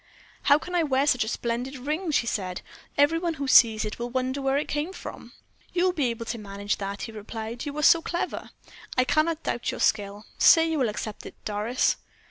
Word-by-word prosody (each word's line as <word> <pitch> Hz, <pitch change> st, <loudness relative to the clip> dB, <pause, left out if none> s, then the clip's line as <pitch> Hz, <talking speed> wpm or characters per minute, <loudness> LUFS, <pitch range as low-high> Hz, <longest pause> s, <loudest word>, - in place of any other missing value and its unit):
"How 285 Hz, -, +7 dB
can 360 Hz, +4 st, -8 dB
I 350 Hz, -, +3 dB
wear 275 Hz, -3 st, +2 dB
such 255 Hz, -5 st, +3 dB
a -, -, -6 dB
splendid 240 Hz, +4 st, -3 dB
ring?" 305 Hz, +7 st, -3 dB
she 285 Hz, -6 st, +2 dB
said. 185 Hz, -5 st, -3 dB, 0.3 s
"Every 290 Hz, +3 st, +4 dB
one 335 Hz, -1 st, -1 dB
who 280 Hz, -2 st, -4 dB
sees 225 Hz, -4 st, +6 dB
it 210 Hz, -, -5 dB
will 240 Hz, +1 st, -3 dB
wonder 260 Hz, +2 st, -2 dB
where 270 Hz, 0 st, +1 dB
it 295 Hz, -, -1 dB
came 300 Hz, +6 st, -2 dB
from." -, -, -9 dB, 0.4 s
"You 355 Hz, -, +2 dB
will 370 Hz, -1 st, +3 dB
be 295 Hz, -7 st, +1 dB
able 230 Hz, -1 st, -4 dB
to 225 Hz, +1 st, -4 dB
manage 200 Hz, 0 st, -3 dB
that," 200 Hz, 0 st, -5 dB
he -, -, -5 dB
replied; 220 Hz, +4 st, -6 dB
"you 290 Hz, +1 st, -5 dB
are 300 Hz, -, -1 dB
so 335 Hz, -, +6 dB
clever. 345 Hz, +1 st, -3 dB, 0.5 s
I 255 Hz, -, +5 dB
cannot 310 Hz, +4 st, +1 dB
doubt 240 Hz, -, -2 dB
your -, -, -4 dB
skill. 205 Hz, 0 st, 0 dB
Say 325 Hz, -1 st, +7 dB
you 315 Hz, -, 0 dB
will 250 Hz, -4 st, +2 dB
accept 210 Hz, 0 st, -6 dB
it, -, -, -11 dB
Doris?" 215 Hz, +4 st, 0 dB
255 Hz, 220 wpm, -26 LUFS, 220-300 Hz, 0.5 s, How